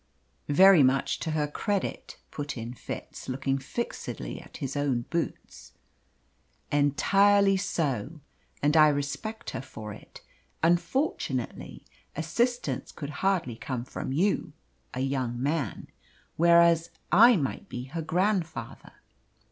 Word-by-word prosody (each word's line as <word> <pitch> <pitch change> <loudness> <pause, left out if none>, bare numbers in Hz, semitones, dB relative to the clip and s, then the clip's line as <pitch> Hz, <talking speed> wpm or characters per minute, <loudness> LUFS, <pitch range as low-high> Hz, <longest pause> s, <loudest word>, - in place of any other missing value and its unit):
"Very 185 +3 +7
much 130 0 +2
to 165 - -3
her 155 -1 0
credit," 200 +6 -3
put 145 -2 -5
in 115 +1 -5
Fitz, 125 - -8
looking 135 +1 -1
fixedly 185 - -5
at - - -12
his 135 -2 -4
own 140 -4 0
boots. 170 -1 -4 1.0
"Entirely 195 +8 +4
so. 155 - -2 0.4
And 150 +2 +3
I 155 -1 +8
respect 150 +10 -3
her 130 - -4
for 105 -5 -8
it. - - -14 0.4
Unfortunately, 165 - -1 0.3
assistance 165 - -1
could 145 -1 -7
hardly 185 -11 +1
come 120 +1 -4
from 130 - -5
you 185 +9 0 0.4
a 130 - -4
young 130 -3 -1
man. 145 +2 -2 0.5
Whereas, 170 0 +5 0.2
I 230 +7 +8
might 140 -8 -3
be 125 - -5
her 155 +6 -5
grandfather." 180 +1 -2
150 Hz, 115 wpm, -28 LUFS, 135-180 Hz, 1.0 s, I